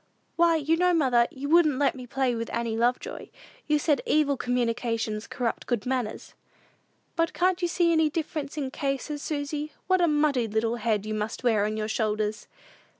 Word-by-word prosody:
"Why, 335 -1 +4
you 320 +1 +1
know, 360 0 +3
mother, 250 -6 +3
you 275 +2 -6
wouldn't 310 -3 +4
let 285 0 +2
me 255 -2 -9
play 265 0 0
with 230 0 -4
Annie 230 -1 -2
Lovejoy. 240 +2 -1 0.4
You 300 - +3
said, 295 -3 +1
'evil 295 -2 +3
communications 230 -3 -1
corrupted 240 -3 -3
good 240 -5 -1
manners.'" 250 -4 -3 0.8
"But 330 -1 +1
can't 365 0 +1
you 350 - +2
see 345 -1 +2
any 320 -2 +3
difference 305 -2 -4
in 290 - -1
the 260 - -5
cases, 280 +2 -3
Susy? 295 0 -3
What 370 0 +3
a 345 - +4
muddy 295 -6 +2
little 225 +2 0
head 215 -2 0
you 215 - -3
must 215 +3 -3
wear 220 -4 +3
on 215 +1 -2
your 215 0 -2
shoulders!" 215 -1 -1
260 Hz, 185 wpm, -27 LUFS, 230-305 Hz, 0.8 s, Why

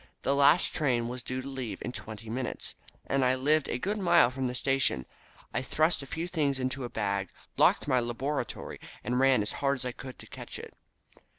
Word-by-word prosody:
The 140 - +2
last 140 +5 +5
train 125 -6 +1
was 125 0 -4
due 130 +1 -3
to - - -7
leave 130 -7 -4
in 125 - -3
twenty 110 -2 -7
minutes, 120 +3 -3 0.3
and 135 -1 +1
I 130 0 +4
lived 150 +3 +2
a - - 0
good 205 +10 -2
mile 170 -9 +5
from 130 0 -2
the 125 - -3
station, 135 - +2 0.5
I - - 0
thrust 155 +4 +2
a 140 - -9
few 160 +5 -3
things 145 -6 0
into 130 +1 -2
a 120 - -4
bag, 100 -3 -1 0.3
locked - - +4
my 130 -3 +4
laboratory, 125 +3 -3 0.2
and 125 +1 0
ran 130 -5 +5
as 105 - +1
hard 140 0 +3
as 130 -2 -6
I 125 - -1
could 130 +1 -9
to - - -11
catch - - -8
it. - - -9
130 Hz, 210 wpm, -30 LUFS, 120-140 Hz, 0.5 s, last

